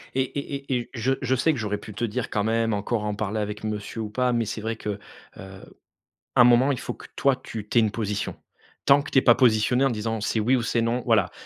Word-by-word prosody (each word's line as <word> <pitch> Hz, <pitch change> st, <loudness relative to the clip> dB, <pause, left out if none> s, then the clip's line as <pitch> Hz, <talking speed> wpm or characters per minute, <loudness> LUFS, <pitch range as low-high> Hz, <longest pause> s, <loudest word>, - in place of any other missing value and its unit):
Et 135 Hz, -, +3 dB
et 140 Hz, +2 st, -4 dB, 0.2 s
et 125 Hz, -, +2 dB
et -, -, -11 dB
je 125 Hz, +2 st, 0 dB
je 130 Hz, 0 st, +1 dB
sais 155 Hz, +5 st, +2 dB
que 125 Hz, -, -4 dB
j'aurais 105 Hz, -1 st, -2 dB
pu 105 Hz, -, -10 dB
te 120 Hz, +3 st, -2 dB
dire 115 Hz, +2 st, -3 dB
quand 105 Hz, -, 0 dB
même 115 Hz, 0 st, +1 dB
encore 105 Hz, +2 st, -1 dB
en 105 Hz, -1 st, -2 dB
parler 110 Hz, +1 st, -2 dB
avec 105 Hz, 0 st, -4 dB
monsieur 110 Hz, +1 st, -4 dB
ou 105 Hz, -, -4 dB
pas, 125 Hz, +3 st, 0 dB
mais 115 Hz, -1 st, 0 dB
c'est 110 Hz, +1 st, -5 dB
vrai 115 Hz, +1 st, -2 dB
que, 105 Hz, -, -6 dB
heu, 100 Hz, 0 st, -3 dB, 0.4 s
à 95 Hz, 0 st, -13 dB, 0.6 s
un -, -, +10 dB
moment 125 Hz, +3 st, +5 dB
il 130 Hz, -, -2 dB
faut -, -, -5 dB
que -, -, -13 dB
toi, 135 Hz, -1 st, +3 dB
tu 110 Hz, -4 st, -8 dB
tu 120 Hz, -, -1 dB
aies -, -, +5 dB
une 110 Hz, -2 st, +1 dB
position 105 Hz, -2 st, -3 dB, 0.5 s
tant 140 Hz, +1 st, +6 dB
que 145 Hz, -, -8 dB
tu -, -, 0 dB
es -, -, +7 dB
pas 120 Hz, -, +7 dB
positionnée 125 Hz, +1 st, +3 dB
en 135 Hz, -, +4 dB
disant 110 Hz, -1 st, -3 dB
c'est 110 Hz, -, 0 dB
«oui 120 Hz, +5 st, +3 dB
ou 120 Hz, -, +1 dB
c'est 115 Hz, 0 st, 0 dB
non», 120 Hz, +2 st, 0 dB
voilà! 110 Hz, -6 st, +3 dB
115 Hz, 270 wpm, -25 LUFS, 105-125 Hz, 0.6 s, un